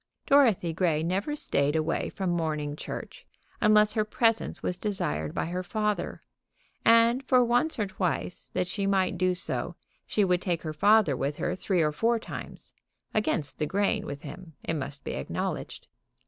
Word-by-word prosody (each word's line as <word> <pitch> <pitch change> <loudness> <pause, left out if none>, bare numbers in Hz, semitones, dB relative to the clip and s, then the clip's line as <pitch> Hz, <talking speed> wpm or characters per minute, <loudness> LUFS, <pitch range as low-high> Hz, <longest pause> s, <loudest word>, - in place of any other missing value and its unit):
Dorothy 230 -12 +4
Grey 160 -3 +1
never 195 - -1
stayed 145 - 0
away 160 +1 0
from 190 -3 -2
morning 155 -3 -1
church - - -7 0.4
unless 210 0 +5
her 215 -1 +2
presence 225 +1 0
was 180 - -2
desired 80 - -2
by - - 0
her 180 +2 -3
father, 210 +2 -2 0.6
and 230 +3 +5
for 255 -2 +4
once 245 +7 +1
or 210 - +1
twice 185 -2 -3
that 180 - +1
she 195 +2 -2
might 190 -2 +2
do 185 0 +2
so 180 - -2 0.3
she 210 - +2
would 180 -1 +2
take 175 -3 -2
her 155 -1 -4
father 205 -2 +4
with 140 +3 -2
her 175 - -2
three 185 -2 +1
or 150 - +2
four 230 +10 +1
times, 225 - -9 0.4
against 175 -9 -1
the 150 - 0
grain 205 +3 0
with 140 0 -6
him, 180 -4 -9
it - - -2
must 140 -2 -5
be - - -4
acknowledged. 70 - -4
185 Hz, 170 wpm, -28 LUFS, 160-215 Hz, 0.6 s, unless